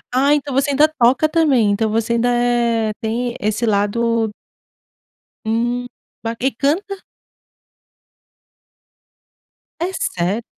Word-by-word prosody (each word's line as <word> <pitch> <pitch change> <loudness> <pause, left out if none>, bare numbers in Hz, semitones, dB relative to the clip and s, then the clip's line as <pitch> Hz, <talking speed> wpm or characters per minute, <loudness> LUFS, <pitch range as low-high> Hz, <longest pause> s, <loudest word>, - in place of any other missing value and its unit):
Ah, 280 +3 +4
então 285 -1 -3
você 275 +2 +1
ainda 290 +2 +4
toca 265 0 +2
também? 290 -10 +2
Então, 220 +2 0
você 225 +1 0
ainda 235 +1 +1
é, 240 -2 +1
tem 235 +2 -2
esse 215 +3 0
lado 225 +1 +1 1.1
Hum, 240 +2 -1 0.4
ba 230 0 -3
E 265 +2 +1
canta? 360 - -2 2.8
É 350 +3 -1 0.2
sério. 185 +6 -1
240 Hz, 110 wpm, -19 LUFS, 225-275 Hz, 2.8 s, Ah